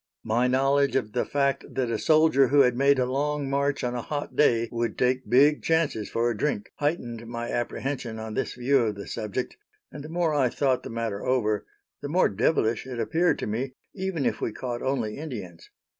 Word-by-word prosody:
My 115 +3 +1
knowledge 135 +1 +2
of 125 -5 0
the 125 - 0
fact 140 -1 0
that 125 -3 0
a 110 - -1
soldier 155 -4 +4
who 140 +3 +5
had 125 -2 +3
made 140 +2 +4
a 130 - +2
long 145 +2 -1
march 140 +1 0
on 125 0 -1
a 120 - -2
hot 145 +4 -5
day 115 -5 +3
would 115 0 -2
take 125 +1 0
big 145 +4 +5
chances 160 -10 0
for 115 +1 0
a - - -3
drink, 110 -2 -2
heightened 120 -7 -2
my 120 0 -4
apprehension 120 -1 -3
on 110 0 -6
this - - -2
view 130 +3 +2
of 110 -4 0
the 100 - -7
subject, 110 +4 -4 0.3
and 145 - -8
the 155 - -8
more 165 -1 0
I 135 -4 +3
thought 130 0 +1
the - - -8
matter 115 -3 -3
over, 110 -5 0 0.3
the 145 - -5
more 180 +5 +3
devilish 110 +2 +1
it 125 -2 -5
appeared 165 +3 +2
to - - -4
me, 125 +5 -3 0.2
even 190 -7 -2
if - - -1
we - - -1
caught 120 +2 -5
only 130 -4 -2
Indians. 105 - -8
130 Hz, 205 wpm, -26 LUFS, 115-145 Hz, 0.3 s, who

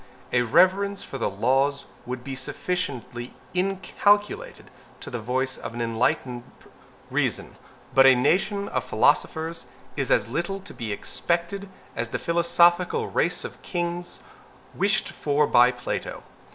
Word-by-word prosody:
A 125 - +4
reverence 185 - +3
for 135 - -7
the - - 0
laws 135 +7 +1 0.2
would 125 0 -5
be 135 0 -5
sufficiently 125 -4 -4 0.2
inculcated 205 - 0 0.3
by - - -8
the 120 - -3
voice 130 +4 -1
of 115 - -7
an 120 - -3
enlightened 120 +2 0 0.7
reason. - - -1 0.4
But 135 0 +7
a 130 - +8
nation 200 +10 +1
of - - -1
philosophers 165 +1 +1 0.3
is 135 -3 -2
as - - +3
little 175 +10 -2
to 200 - -11
be 115 -3 -5
expected 170 - -2 0.3
as 115 0 -2
the - - -2
philosophical 170 +1 +3
race 175 +1 +1
of - - -9
kings 175 0 -3 0.6
wished 200 0 +1
for 150 0 +1
by 125 -2 +6
Plato. 125 -1 -5
160 Hz, 135 wpm, -25 LUFS, 125-180 Hz, 0.7 s, a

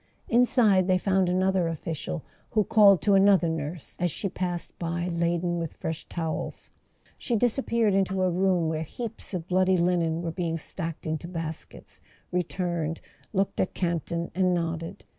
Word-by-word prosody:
Inside 230 -6 +4
they 185 -1 +4
found 190 -1 +2
another 185 -1 +2
official, 165 0 -4 0.3
who 215 - +2
called 200 -5 +6
to 205 - +4
another 195 -2 +5
nurse 160 0 -4
as 175 0 +1
she 195 +5 -3
passed 175 -1 -3
by 170 +1 -2
laden 170 0 0
with 165 -2 -4
fresh 160 0 -5
towels. 160 -2 -4 0.5
She 240 - -1
disappeared 230 -2 +2
into 190 -1 +1
a 185 - +2
room 180 -2 +2
where 160 0 -1
heaps 225 +5 -6
of 170 -2 -4
bloody 185 0 +3
linen 170 -1 +1
were 165 - -2
being 165 -1 -2
stacked 165 0 -5
into 160 +1 -3
baskets, 165 -3 -7 0.3
returned, 175 -2 -2 0.3
looked 195 -1 0
at 185 - 0
Campton 170 -1 -2
and 185 0 +2
nodded. 165 -1 -3
175 Hz, 155 wpm, -27 LUFS, 165-190 Hz, 0.5 s, called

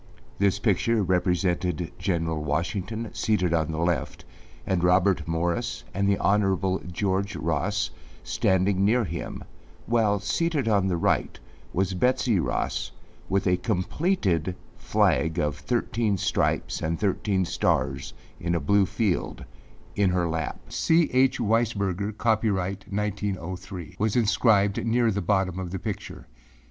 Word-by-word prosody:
This 100 0 +3
picture 105 +1 +1
represented 90 -2 0
General 80 -4 -1
Washington 95 +9 -2
seated 90 -6 +1
on 80 -2 +1
the 80 - -4
left 85 +1 -1 0.4
and 90 -2 0
Robert 90 -2 +3
Morris 85 +1 -1
and 100 +1 +1
the 100 - +3
Hon. 95 -2 +1
George 100 +2 -1
Ross 85 +6 -1 0.3
standing 95 +1 +1
near 115 +4 +3
him, 100 - -5 0.4
while, 110 -3 +2
seated 145 - 0
on 100 -3 +3
the 90 -2 0
right, - - 0 0.3
was 95 +1 0
Betsey 120 +1 +2
Ross - - -1 0.4
with 100 0 +1
a 90 -1 +3
completed 95 - 0 0.2
flag 80 +1 +1
of 75 -3 0
thirteen 115 - 0
stripes, - - 0
and 80 +1 -1
thirteen 95 -1 0
stars - - -1 0.2
in 85 0 -1
a - - +1
blue 100 0 +3
field, 105 -4 -1 0.5
in 100 -2 +3
her 90 -1 +1
lap. 80 0 -3
âC. 165 0 +2
H. 130 0 +3
Weisberger, 105 -4 0
Copyright 100 -5 0
1903,â 95 -3 -4
was 110 0 +1
inscribed 105 -3 +3
near 115 0 +2
the 100 0 -1
bottom 95 -3 0
of 90 -2 -4
the 95 - -4
picture. - - -6
95 Hz, 130 wpm, -26 LUFS, 90-105 Hz, 0.5 s, This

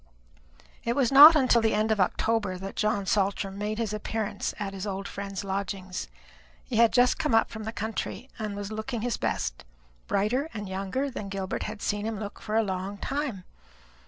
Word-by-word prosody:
It 235 +1 0
was 270 -3 +2
not 295 +4 +11
until 255 -5 +4
the 220 -1 +2
end 215 +1 +1
of 215 - +1
October 205 0 0
that 195 +1 -7
John 210 -2 0
Saltram 195 0 0
made 210 +1 -2
his 225 -2 -2
appearance 215 -1 -2
at 200 -1 -4
his 195 +1 -5
old 195 0 -4
friend's 195 0 -5
lodgings. 190 -1 -4 0.6
He 230 - -3
had 230 -1 +6
just 250 0 +4
come 225 - +2
up 225 - +3
from 220 -1 -6
the 220 - -3
country, 220 +1 -4
and 210 -2 -3
was 205 +1 -5
looking 220 +1 -3
his 240 +1 -1
best - - -2 0.4
brighter 240 +10 +1
and 205 -1 -4
younger 195 +9 -2
than 205 -5 -6
Gilbert 195 -1 -3
had 215 -1 -7
seen 205 +1 -1
him 220 -2 -3
look 205 -1 -7
for 215 - -3
a 225 - +4
long 190 0 -3
time. 270 -7 -3
210 Hz, 190 wpm, -27 LUFS, 195-225 Hz, 0.6 s, not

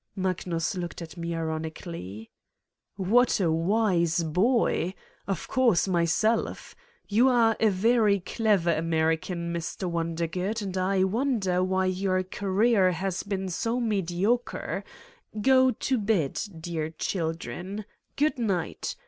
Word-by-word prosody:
Magnus 185 -3 -1
looked 175 -2 -5
at 160 - -10
me 170 -1 -4
ironically: 160 - -5 0.6
"What 215 +7 +3
a 175 -4 +2
wise 170 -1 +2
boy! 185 +1 +1 0.3
Of 195 -4 -3
course, 235 -9 +3
myself! 185 +6 0 0.3
You 235 +6 +4
are 230 -3 +4
a 220 - +4
very 210 +1 +3
clever 190 -3 +1
American, 165 +2 -1
Mr. 170 +2 -4
Wondergood, 170 +5 -2
and 190 -2 -4
I 185 +1 +2
wonder 195 -4 +1
why 190 0 +1
your 185 0 0
career 195 +1 +2
has 185 +1 -2
been 195 -2 -3
so 230 +7 -1
mediocre. 210 +1 -1 0.6
Go 260 +3 +5
to 255 0 -1
bed, 200 -9 0 0.2
dear 160 -2 -3
children. 175 +4 -4 0.3
Good 295 -1 +1
night. 195 -8 -2
185 Hz, 115 wpm, -27 LUFS, 170-215 Hz, 0.6 s, Go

